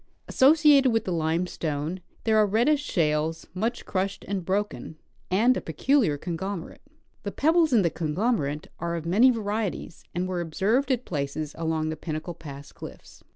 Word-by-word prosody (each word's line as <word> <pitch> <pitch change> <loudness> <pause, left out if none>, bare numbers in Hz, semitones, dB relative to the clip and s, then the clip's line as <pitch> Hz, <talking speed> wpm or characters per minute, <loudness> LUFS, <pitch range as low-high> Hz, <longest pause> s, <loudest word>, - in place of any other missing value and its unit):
Associated 290 -1 +5
with 225 0 0
the 185 - -2
limestone 160 0 -2 0.2
there 220 -1 +2
are 215 -1 +5
reddish 240 +9 +2
shales, 160 - 0
much 225 +6 -2
crushed 195 +1 -2
and 195 -2 -2
broken, 195 -3 -3 0.3
and 230 +7 +4
a - - -2
peculiar 200 - +1
con 170 +3 -4
glomerate. 190 0 -5 0.4
The - - -4
pebbles 320 +1 +3
in 225 -5 +4
the 170 - +1
conglomerate 155 - -1
are 170 0 -2
of 165 -1 -5
many 210 +10 +5
varie 215 -3 0
ties, - - -10
and 180 +1 -1
were 180 -1 -2
observed 200 - 0
at 255 -2 0
places 145 0 -3
along 160 -1 -1
the 160 - -3
Pinnacle 155 +2 -5
pass 145 -3 -10
cliffs. - - -12
185 Hz, 165 wpm, -26 LUFS, 160-225 Hz, 0.4 s, Associated